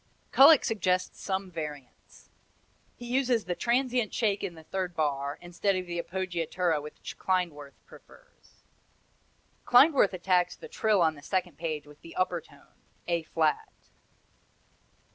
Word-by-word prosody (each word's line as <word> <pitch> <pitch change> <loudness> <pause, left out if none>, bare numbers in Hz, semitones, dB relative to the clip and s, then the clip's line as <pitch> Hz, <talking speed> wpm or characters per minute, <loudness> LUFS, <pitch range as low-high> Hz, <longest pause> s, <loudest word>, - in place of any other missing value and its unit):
Kullak 285 +2 +7
suggests 185 -5 -1
some 190 -1 -3
variants. 150 -6 -9 0.7
He 240 - -9
uses 245 -3 +1
the 180 - -1
transient 240 +4 0
shake 205 -3 0
in 170 - -4
the 160 - -13
third 180 +1 -4
bar, 140 -2 -1
instead 175 +3 -1
of 185 0 -3
the 175 -1 -3
appoggiatura 175 -3 -2
which 150 +1 -10
Klindworth 170 -7 -2
prefers. - - -20 1.0
Klindworth 260 -5 +6
attacks 180 -1 +1
the - - -11
trill 210 -5 +2
on 160 -1 +2
the 145 - -14
second 180 -1 -2
page 155 -3 -3
with 150 0 -17
the 165 - -12
upper 185 -2 0
tone 140 -2 -22 0.3
A 170 -1 +1
flat. 160 -1 -1
180 Hz, 135 wpm, -28 LUFS, 160-200 Hz, 1.0 s, Kullak